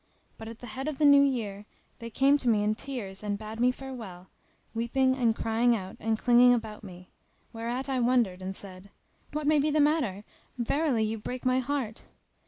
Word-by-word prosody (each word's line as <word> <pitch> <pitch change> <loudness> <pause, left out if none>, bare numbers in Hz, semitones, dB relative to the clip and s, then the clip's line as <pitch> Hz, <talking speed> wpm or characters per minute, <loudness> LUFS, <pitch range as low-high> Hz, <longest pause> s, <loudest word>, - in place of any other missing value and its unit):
But 220 - -8
at 225 0 -8
the 245 - -11
head 265 +2 -4
of 305 -3 -3
the 305 - +2
new 285 -1 +8
year 215 -7 -1 0.3
they 230 - -7
came 275 +5 +3
to 250 - 0
me 210 -2 +3
in 210 +1 +1
tears 215 -6 -5
and 205 -1 -2
bade 215 +1 -8
me 250 +1 +4
farewell, 230 -9 -9 0.4
weeping 260 +3 +1
and 235 -4 +1
crying 230 +2 +2
out 190 -3 -6
and 225 0 0
clinging 245 +1 +5
about 220 -2 -6
me: 180 -2 -12 0.4
whereat 235 +4 -3
I 265 -2 -1
wondered 235 -7 +1
and 190 +1 -5
said, 190 0 -10 0.4
"What 300 0 -3
may 300 0 +4
be 295 +2 +1
the 305 +1 +1
matter? 285 -10 +1 0.3
verily 250 0 +1
you 220 +1 -2
break 250 +4 -6
my 255 0 +3
heart!" 260 -4 -3
235 Hz, 195 wpm, -28 LUFS, 215-265 Hz, 0.4 s, new